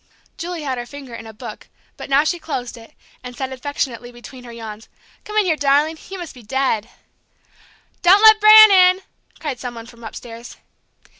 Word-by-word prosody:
Julie 340 -2 -6
had 260 -3 -3
her 240 - -7
finger 275 -2 -11
in 225 -1 -9
a - - -9
book, 215 - -10 0.3
but - - -10
now 275 +2 +4
she 345 +2 -2
closed 250 -7 -5
it, 230 -1 -16 0.3
and 250 -1 -10
said 265 -1 -4
affectionately 255 -3 -5
between 245 +1 -13
her 240 - -10
yawns: 225 -2 -10 0.4
"Come 425 0 -5
in 425 - +3
here, 330 -3 +1
darling! 295 +2 +1
You 385 - -7
must 345 -3 -8
be 250 - -14
dead." 235 -1 -2 1.1
"Don't 385 +4 +5
let 435 -1 +7
Bran 430 0 +9
in," 370 0 +5 0.4
cried 290 -6 -5
some 245 -2 -7
one 230 -1 -9
from 235 0 -16
upstairs. 230 +1 -10
265 Hz, 190 wpm, -19 LUFS, 240-340 Hz, 1.1 s, Bran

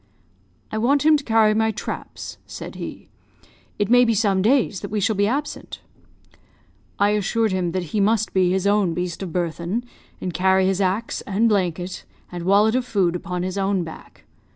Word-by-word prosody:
"'I 215 - -2
want 280 +6 +2
him 315 0 +7
to 290 - -1
carry 220 -3 +4
my 220 +1 +2
traps,' 215 - -6
said - - -8
he; - - -8 0.7
'it 205 - 0
may 245 +2 +6
be 230 -2 +2
some 200 -3 +2
days 225 -3 +2
that 200 - -5
we 210 - -1
shall 215 +2 +1
be 205 +1 +2
absent.' 285 +6 -4 1.2
"I 205 +1 +3
assured 215 +1 +1
him 180 -2 -1
that 185 - -1
he 215 - +1
must 220 +2 +1
be 185 -2 +3
his 190 +1 0
own 200 -4 +2
beast 180 0 -3
of 185 -3 -5
burthen, 175 +6 -2 0.4
and 180 - -4
carry 190 +2 +3
his 190 +1 +1
axe, 195 +5 -1
and 205 +4 +2
blanket, 180 -3 -1 0.3
and 175 -1 -6
wallet 205 +3 +4
of 255 0 +1
food 190 -7 0
upon 180 0 -4
his 185 +2 -3
own 195 -2 +1
back. 160 - -12
200 Hz, 185 wpm, -22 LUFS, 185-220 Hz, 1.2 s, him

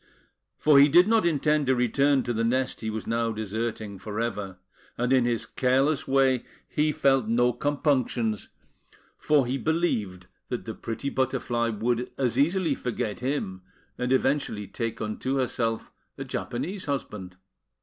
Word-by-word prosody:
For 150 -2 +5
he 140 +1 +7
did 175 +6 +6
not 225 -5 +3
intend 150 -2 +1
to 130 - +4
return 135 +3 +2
to 120 - -2
the 115 0 0
nest 130 +3 0
he 110 - -2
was 110 0 -4
now 115 0 0
deserting 110 -1 -4
for 105 +2 -5
ever; 105 -5 -3 0.4
and 125 +2 +1
in 130 -2 +4
his 120 -2 0
careless 135 +4 +1
way 135 -2 +3 0.2
he 150 +1 +1
felt 135 -5 +2
no 120 +2 +3
compunctions, 130 -5 0 0.7
for 145 -3 +2
he 130 +3 -2
believed 110 - -1 0.2
that - - -4
the - - -4
pretty 125 +5 -4
Butterfly 125 -3 0
would 120 +3 -1
as 125 -1 0
easily 165 +1 +2
forget 115 -5 -3
him, 125 -8 -3 0.3
and 125 +1 -2
eventually 130 -5 +1
take 115 +3 -4
unto 110 +5 -2
herself 115 -3 -1 0.3
a - - -4
Japanese 185 +11 -4
husband. 100 -10 -4
125 Hz, 150 wpm, -26 LUFS, 115-140 Hz, 0.7 s, he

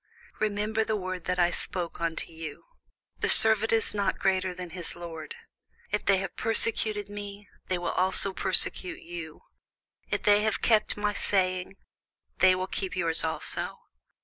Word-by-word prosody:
Remember 215 +1 0
the 220 0 -2
word 185 -3 -5
that 180 - -1
I 175 -1 +3
said - - -4 0.2
unto 165 0 -3
you, 160 -2 -9 0.5
The - - 0
servant 220 0 +7
is 225 -1 0
not 200 -2 -1
greater 190 -1 0
than 180 -1 -8
his 175 -1 -7
lord. 170 - -8 0.6
If 210 - -2
they 195 -1 +4
have 195 -1 -5
persecuted 220 -2 +1
me, 205 0 -8 0.2
they 185 - -1
will 175 - -3
also 190 +1 +3
persecute 185 -1 +1
you; 165 -2 -8 0.7
if - - -2
they 205 0 +5
have 215 0 0
kept 215 -3 +2
my 205 0 -1
saying, 185 -2 -1 0.6
they 185 -1 +6
will 185 0 -2
keep 190 -1 -5
your's 165 -3 +2
also. 160 0 -2
190 Hz, 155 wpm, -27 LUFS, 180-210 Hz, 0.7 s, servant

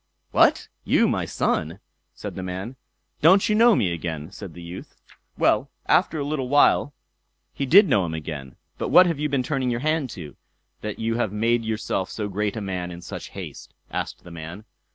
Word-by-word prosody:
"What, - - +4 0.2
you - - +3
my - - 0
son!" 80 +5 -1 0.4
said - - -6
the - - -6
man. 95 +7 -5 0.5
"Don't 185 +6 +6
you 210 - +2
know 230 +1 +6
me 90 -4 +1
again?" 80 -1 -5
said 95 -5 -9
the 90 - -9
youth. 85 +2 -9 0.4
Well, - - +2 0.2
after 160 - +3
a 145 - -1
little 140 -3 -2
while 145 0 +4 0.6
he 140 - -3
did 195 +8 +7
know 100 - +3
him 80 - -4
again. 75 -4 -6 0.2
"But - - -2
what 185 - +8
have 165 -4 -1
you 150 0 0
been 135 -2 0
turning 130 -1 -1
your 120 0 -1
hand 155 -2 0
to, 75 -5 -9 0.5
that 105 -1 -4
you 115 +1 -1
have 115 -5 0
made 115 +3 +1
yourself 110 -4 -2
so 105 -2 -4
great 105 +2 -2
a - - -3
man 90 -3 -3
in 85 0 -9
such - - -7
haste?" - - -9 0.2
asked - - -4
the 90 - -12
man. 85 +5 -8
105 Hz, 195 wpm, -24 LUFS, 90-140 Hz, 0.6 s, what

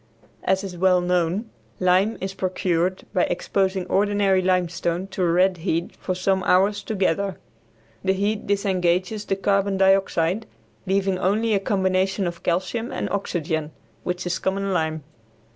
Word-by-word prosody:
As 190 +1 +1
is 190 -2 -6
well 185 0 +4
known, 180 +4 0 0.3
lime 185 +4 +3
is 190 0 -4
procured 185 -1 -1
by 185 - +3
exposing 190 +1 -1
ordinary 200 0 +2
limestone 180 -1 0
to 190 0 -4
a 175 -2 +3
red 185 +1 +3
heat 170 0 -2
for 185 - -3
some 190 +1 +1
hours 200 +3 +3
together. 195 -3 -1 0.7
The 190 0 +2
heat 205 +2 -1
disengages 190 0 0
the 195 - 0
carbon 195 0 +1
dioxide, 195 +1 +2 0.4
leaving 190 -1 +1
only 215 +4 +1
a 200 - +3
combination 190 0 +1
of 170 -1 -4
calcium 185 +7 -1
and - - -3
oxygen, 160 -5 -2 0.3
which 180 0 -3
is 180 0 -1
common 195 0 -1
lime. 160 -3 -1
190 Hz, 145 wpm, -23 LUFS, 180-195 Hz, 0.7 s, well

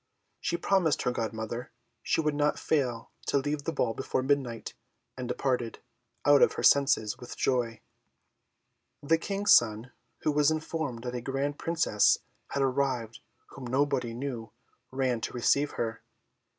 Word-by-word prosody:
She - - -1
promised 180 -6 +2
her 125 - +1
godmother 115 +1 -4 0.3
she - - +1
would 150 -1 0
not 150 0 +1
fail 125 -7 -1 0.2
to - - +2
leave 145 +1 -2
the - - 0
ball 125 -7 0
before 130 +1 -2
midnight, 130 -4 -1 0.4
and 125 -1 -5
departed, 125 -3 -1 0.5
out 145 -1 +6
of - - +5
her - - -4
senses 135 -7 +4
with 125 - -9
joy. 120 -3 0 1.2
The 160 +3 +3
King's 200 +3 0
son, 115 +2 +4 0.3
who 155 - +2
was 150 0 +4
informed 155 -6 -3
that 125 -1 -4
a 125 - -3
grand 135 +3 -2
Princess 165 -11 +3 0.3
had 140 - -1
arrived 130 -4 -1 0.3
whom 130 -2 -9
nobody 130 -2 0
knew, 120 -4 -5 0.4
ran 130 -3 0
to - - -4
receive 140 +4 +2
her. 115 -1 -3
130 Hz, 150 wpm, -29 LUFS, 120-145 Hz, 1.2 s, out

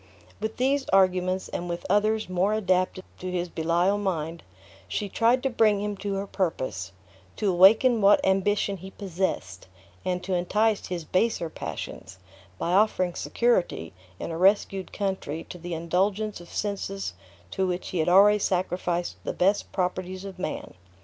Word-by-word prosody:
With 220 +1 -4
these 270 +2 +1
arguments, 185 -1 +2
and 175 0 -4
with 170 0 -4
others 215 +2 +2
more 185 +3 +1
adapted 185 -2 +1 0.2
to 185 - -4
his 180 -1 -2
Belial 170 +5 +1
mind, 165 -4 -2 0.5
she 205 - -2
tried 235 +5 +2
to 270 - +2
bring 215 -3 +3
him 205 0 -2
to 200 0 -3
her 195 +1 -2
purpose; 130 - -2 0.4
to 205 -3 +1
awaken 215 +6 +6
what 200 +1 +6
ambition 195 +1 +1
he 190 +2 -9
possessed; 180 - -3 0.4
and 180 -1 -2
to 190 +1 -2
entice 210 +4 +1
his 175 -3 -4
baser 185 -2 0
passions, 95 - -7 0.4
by 170 - -2
offering 185 -2 +3
security 180 - 0 0.2
in - - -5
a 165 - -4
rescued 195 0 +2
country 190 -6 -3
to 180 - -8
the 175 0 -5
indulgence 190 +5 -1
of 175 - -13
senses 195 - -3 0.4
to 190 -1 0
which 180 0 -3
he 180 - -2
had 160 - +2
already 205 +3 +6
sacrificed 180 -2 -1
the - - -3
best 195 +3 +1
properties 185 0 -2
of 190 -2 -8
man. 170 - -4
190 Hz, 155 wpm, -26 LUFS, 175-205 Hz, 0.5 s, awaken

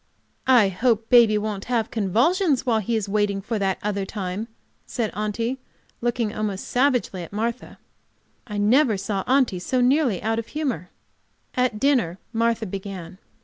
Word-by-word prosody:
"I 240 -6 +6
hope 225 +4 0
baby 230 -3 +7
won't 210 -2 -3
have 230 -3 -1
convulsions 265 - +2
while 230 -3 +2
he 225 +2 -1
is 215 -2 -1
waiting 205 -1 0
for 215 +2 -3
that 195 -1 0
other 200 -1 -1
time," 195 +1 -4 0.4
said 230 -4 -2
Aunty, 230 +5 -2 0.4
looking 235 -2 -1
almost 210 -3 -3
savagely 250 -7 +1
at 170 - -9
Martha. 230 +4 -3 0.7
I 210 -2 -5
never 220 +2 +3
saw 195 0 -2
Aunty 255 -8 +2
so 255 +8 -1
nearly 250 - +3
out 225 +1 0
of 230 - -6
humor. 260 - -3 0.6
At 250 -4 0
dinner 245 -11 +2 0.2
Martha 230 0 +1
began. 190 -2 -7
220 Hz, 150 wpm, -23 LUFS, 200-245 Hz, 0.7 s, baby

